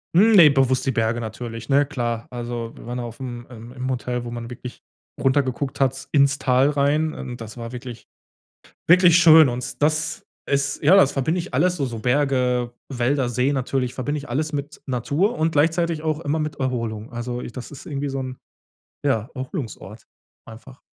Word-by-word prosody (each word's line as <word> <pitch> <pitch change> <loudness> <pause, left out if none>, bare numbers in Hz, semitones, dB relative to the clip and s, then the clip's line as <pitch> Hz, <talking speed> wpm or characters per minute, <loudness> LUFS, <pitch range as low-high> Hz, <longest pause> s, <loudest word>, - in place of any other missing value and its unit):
Hm, 210 +6 +6
ne, 170 -6 +9
bewusst 135 -2 +2
die - - +3
Berge 115 -1 0
natürlich, 115 +1 -7
ne, 140 +1 +4
klar. 120 -5 -3
Also, 120 -1 -5
wir - - -12
waren 120 +1 -4
ja 125 - -3
auf 115 -1 -8
'm 120 -2 -6
ähm, 115 0 -10
im 130 0 -4
Hotel, 125 -1 -3
wo 120 - -6
man 120 -1 -6
wirklich 125 0 -9 0.4
runter 135 +1 +3
geguckt 130 +1 -4
hat 135 0 0
ins 140 -1 +3
Tal 130 +1 +3
rein 150 +2 +1
und 125 -3 -7
das 110 +1 -9
war 115 0 -6
wirklich, 125 -1 -8 0.8
wirklich 175 0 +7
schön 160 -3 +8
und 125 +2 -5
das 155 +1 0 0.2
ist 140 0 0
ja, 165 +6 +7
das 145 -8 +5
verbinde 155 +6 0
ich 180 +3 -7
alles 180 0 +2
so 140 - 0
so 120 -3 -5
Berge, 125 -1 +1 0.2
Wälder, 130 0 0
See 125 +4 +1
natürlich 130 -1 -1
verbinde 145 +4 -2
ich 145 0 -7
alles 150 +6 -2
mit 145 +1 -5
Natur 145 - 0
und 160 +1 +1
gleichzeitig 165 +2 +1
auch 155 -1 -1
immer 160 -1 -1
mit 150 -1 -3
Erholung. 115 -4 -3
Also, 120 +1 -4
i - - -6
das 125 +1 -8
ist 140 - -11
irgendwie 140 -1 -3
so 135 0 -3
'n, 130 -1 -5 0.7
ja, 115 -5 +1
Erholungsort 130 - -6 0.4
einfach. 125 +4 -13
130 Hz, 190 wpm, -22 LUFS, 120-145 Hz, 0.8 s, ne